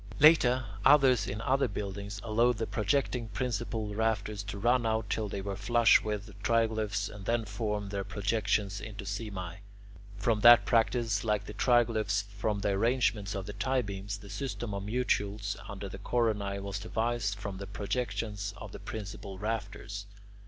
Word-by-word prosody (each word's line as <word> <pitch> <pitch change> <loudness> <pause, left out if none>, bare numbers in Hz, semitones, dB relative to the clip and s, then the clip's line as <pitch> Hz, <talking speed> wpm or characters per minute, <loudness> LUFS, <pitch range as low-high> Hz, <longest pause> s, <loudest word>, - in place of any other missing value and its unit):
Later, 130 -5 +6 0.2
others 130 -6 +6
in 105 +3 -4
other 135 +2 +2
buildings 100 0 -5
allowed 115 +2 +2
the 115 - -1
projecting 115 +2 0
principal 115 -2 -2
rafters 105 -1 0
to 100 0 -6
run 120 +4 +3
out 110 -1 -1
till 110 -2 -1
they 100 - -4
were 100 0 -4
flush 115 +3 +5
with 105 -1 -3
the 105 - -12
triglyphs, 110 -3 +1
and 105 -1 -9
then 115 +1 +1
formed 105 -1 -3
their 100 -1 -2
projections 100 -1 0
into 105 -1 -7
simae. 100 -4 -5 0.6
From 110 +1 +1
that 120 +2 +8
practice, 115 -2 +2
like 105 -2 0
the 105 - -7
triglyphs 110 -4 +2
from 105 0 -1
the 100 - +1
arrangement 105 -1 +1
of 95 -1 -4
the 105 - -6
tie 125 +5 0
beams, 100 0 -5
the 100 -1 -12
system 120 -1 -4
of 100 - -3
mutules 105 -2 -1
under 100 0 -6
the 95 - -8
coronae 105 -5 0
was 100 +1 -4
devised 110 -1 -1
from 100 -1 -5
the 100 +1 -7
projections 105 -1 -3
of 105 - -8
the - - -8
principal 100 -2 -7
rafters. 100 -1 -4
105 Hz, 165 wpm, -30 LUFS, 100-115 Hz, 0.6 s, that